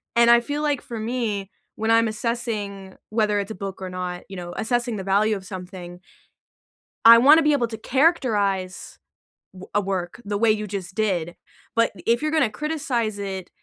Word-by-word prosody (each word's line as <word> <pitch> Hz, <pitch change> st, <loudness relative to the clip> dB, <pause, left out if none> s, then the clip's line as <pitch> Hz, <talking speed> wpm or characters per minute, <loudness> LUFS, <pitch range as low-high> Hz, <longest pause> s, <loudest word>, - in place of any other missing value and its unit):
and 235 Hz, 0 st, +5 dB
I 235 Hz, -, +7 dB
feel 290 Hz, +4 st, -3 dB
like 290 Hz, -3 st, 0 dB
for 235 Hz, -, -7 dB
me, 215 Hz, -4 st, -2 dB, 0.3 s
when 220 Hz, +1 st, 0 dB
I'm 230 Hz, 0 st, +4 dB
assessing 215 Hz, -4 st, -4 dB
whether 215 Hz, -1 st, +1 dB
it's 200 Hz, +1 st, -4 dB
a -, -, -5 dB
book 195 Hz, 0 st, -6 dB
or 185 Hz, -, -4 dB
not, 180 Hz, -1 st, -5 dB
you 195 Hz, -, -8 dB
know, 175 Hz, -1 st, -7 dB
assessing 240 Hz, +1 st, -1 dB
the 190 Hz, -, -5 dB
value 205 Hz, +3 st, +2 dB
of 195 Hz, -, -7 dB
something 180 Hz, -1 st, -8 dB, 1.1 s
I 230 Hz, 0 st, +11 dB
wanna 300 Hz, +6 st, +7 dB
be 300 Hz, 0 st, +4 dB
able 245 Hz, -5 st, +1 dB
to 225 Hz, -1 st, -7 dB
characterize 215 Hz, -, 0 dB, 0.6 s
w 185 Hz, 0 st, -11 dB
a 205 Hz, -, +4 dB
work 190 Hz, +1 st, -4 dB
the 205 Hz, 0 st, -2 dB
way 225 Hz, +1 st, +4 dB
you 215 Hz, 0 st, -1 dB
just 190 Hz, -2 st, -6 dB
did, 180 Hz, -6 st, -1 dB, 0.4 s
but 230 Hz, 0 st, +3 dB
if 235 Hz, +2 st, +2 dB
you're 305 Hz, 0 st, -1 dB
gonna 310 Hz, -7 st, +2 dB
criticize 245 Hz, -5 st, -2 dB
it, 190 Hz, -2 st, -5 dB
215 Hz, 185 wpm, -23 LUFS, 190-235 Hz, 1.1 s, I